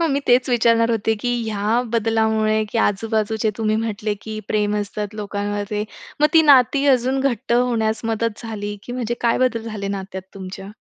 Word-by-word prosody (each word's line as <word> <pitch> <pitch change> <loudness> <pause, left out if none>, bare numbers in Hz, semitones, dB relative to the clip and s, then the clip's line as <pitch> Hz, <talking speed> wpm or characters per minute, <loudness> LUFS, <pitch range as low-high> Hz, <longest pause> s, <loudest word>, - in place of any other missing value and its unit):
हां, 330 - +2
मी 280 +1 +1
तेच 250 +1 +4
विचारणार 230 -1 +3
होते 225 -1 +1
की 245 - 0 0.2
ह्या 215 +3 +1
बदलामुळे 220 -1 +2
की 230 - 0
आजूबाजूचे 220 +1 0
तुम्ही 215 -1 +1
म्हटले 215 -1 -2
की 220 -1 -6
प्रेम 210 0 +1
असतात 210 0 -4
लोकांवरचे. 205 0 -3 0.4
मग 300 - +6
ती 320 - +8
नाती 280 -1 +5
अजून 260 +2 -1
घट्ट 240 -4 -1
होण्यास 235 -3 +1
मदत 225 -1 -2
झाली? 205 -2 -5
की 245 - -8
म्हणजे 240 -2 -2
काय 235 -1 +2
बदल 250 -3 +1
झाले 215 -3 -5
नात्यात 190 -1 -5
तुमच्या? 190 0 -8
220 Hz, 170 wpm, -21 LUFS, 210-235 Hz, 0.4 s, ती